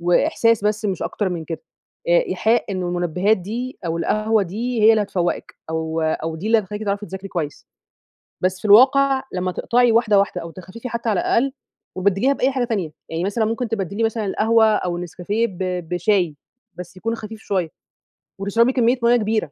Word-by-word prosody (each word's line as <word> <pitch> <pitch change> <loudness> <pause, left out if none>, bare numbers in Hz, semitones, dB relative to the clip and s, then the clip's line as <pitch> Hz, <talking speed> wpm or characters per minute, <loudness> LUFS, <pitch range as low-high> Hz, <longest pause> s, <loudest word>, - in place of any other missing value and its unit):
وإحساس 230 - +2
بس 210 +1 0
مش 195 -4 -1
أكتر 205 - -2
من 170 -3 -4
كده. 165 +1 -6 0.5
آآ - - +4
إيحاء 230 +2 +1
إن 185 -1 -2
المنبهات 180 +4 +1
دي، 235 +8 -5
أو 165 0 -1
القهوة 215 +4 +1
دي، 225 +5 -2
هي 220 - +8
اللي 220 -1 +4
هتفوّقِك، 180 -3 -2 0.2
أو 160 0 -2
أو 160 0 -1
دي 185 - -6
اللي 225 +1 +4
هتخلّيكِ 210 +1 -5
تعرفي 205 0 -2
تذاكري 190 +1 -7
كويس. 155 -6 -4 0.7
بس 185 0 0
في - - -19
الواقع 265 +5 +6
لما 185 0 -2
تقطعي 240 +4 +2
واحدة 220 -3 +4
واحدة، 180 -3 0
أو 165 - -7
تخففي 185 +8 -9
حتى 235 -1 -4
على 210 - +2
الأقل، 265 +4 +1 0.4
وتبدّليها 200 +8 +2
بأي 270 -1 +1
حاجة 255 -2 0
تانية. 195 -10 -2 0.2
يعني 165 +2 -3
مثلًا 205 +3 0
ممكن 225 +2 -2
تبدّلي 200 0 -2
مثلًا 225 -1 -1
القهوة، 220 +3 +3
أو 180 -5 0
النسكافيه، 180 +6 -2
ب 185 -6 -11 0.3
بشاي، 175 -3 +1 0.4
بس 180 +1 -10
يكون 225 +5 -2
خفيف 220 -1 -8
شوية. 185 -6 -1 0.7
وتشربي 230 +6 +2
كمّية 245 0 +2
مَيّة 235 +1 +5
كبيرة. 215 -7 -1
205 Hz, 180 wpm, -21 LUFS, 180-230 Hz, 0.7 s, هي